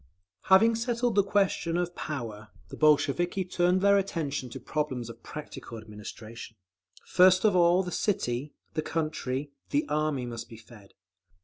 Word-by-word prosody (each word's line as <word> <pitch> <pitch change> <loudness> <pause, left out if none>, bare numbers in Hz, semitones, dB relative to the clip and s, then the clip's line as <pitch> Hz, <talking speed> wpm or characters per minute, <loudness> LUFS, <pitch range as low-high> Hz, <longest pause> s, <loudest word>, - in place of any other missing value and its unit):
Having 205 +5 +6
settled 240 0 0
the 200 0 +4
question 195 -4 +1
of 175 0 -1
power, 115 -8 -5 0.2
the - - -8
Bolsheviki 155 +5 +2
turned 180 +1 +2
their 200 0 +5
attention 150 -9 -3
to - - -7
problems 130 -6 -3
of 115 0 -16
practical 150 -5 -8
administration. 110 +1 -9 0.5
First 185 +2 +5
of 205 -3 +4
all 175 +1 +5
the 180 - -5
city, 145 - -1 0.2
the 155 - 0
country, 150 -4 -3 0.2
the 145 +2 0
Army 150 -3 0
must 120 -1 -7
be 115 - -10
fed. 110 -3 -16
155 Hz, 145 wpm, -28 LUFS, 120-185 Hz, 0.5 s, Having